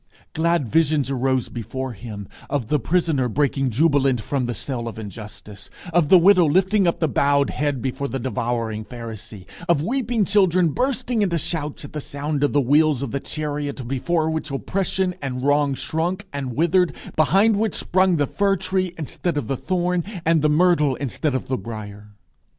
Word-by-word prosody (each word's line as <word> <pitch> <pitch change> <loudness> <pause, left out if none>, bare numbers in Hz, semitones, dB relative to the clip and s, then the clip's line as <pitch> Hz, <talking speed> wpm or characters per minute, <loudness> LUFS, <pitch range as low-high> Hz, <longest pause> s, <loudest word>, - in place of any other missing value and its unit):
Glad 165 -4 +1
visions 150 -1 +2
arose 130 -1 0
before 130 +3 -5
him 100 -2 -8 0.2
of 135 -6 -2
the 150 - +2
prisoner 155 -3 +1
breaking 135 +1 +1
jubilant 135 0 +2
from 130 +2 -2
the 120 - -3
cell 120 +1 -4
of 115 - -6
injustice; 105 -1 -9 0.2
of 165 -4 +3
the 185 - +9
widow 180 0 +6
lifting 190 +5 +3
up 170 - 0
the 160 - +2
bowed 140 0 +2
head 145 -5 -2
before 135 +2 -2
the 135 - -3
devouring 115 -3 -2
Pharisee; 110 -4 -9 0.2
of 155 -4 +3
weeping 240 0 0
children 185 -3 +3
bursting 245 - -1
into 180 -4 +1
shouts 160 -3 -3
at - - -12
the 150 - -4
sound 145 +1 -3
of 145 - +2
the 145 - +3
wheels 145 +1 +3
of 130 - -4
the 140 - -1
chariot 145 -3 -4
before 155 +5 0
which 160 0 -3
oppression 185 +5 -1
and 130 -2 -4
wrong 145 0 +2
shrunk 175 +8 -2
and 135 -4 -4
withered, 170 +3 +2 0.2
behind 195 +7 +4
which 220 -1 0
sprung 185 0 +2
the 145 -2 +2
fir 195 +7 +1
tree 185 -1 -1
instead 165 +1 -3
of 145 - -2
the 135 - -1
thorn, 180 +3 -1 0.2
and 165 -1 +3
the 150 - +3
myrtle 150 -3 +3
instead 140 +2 -2
of 130 - -3
the 130 -1 -1
brier. 105 -2 -9
145 Hz, 180 wpm, -22 LUFS, 130-175 Hz, 0.2 s, the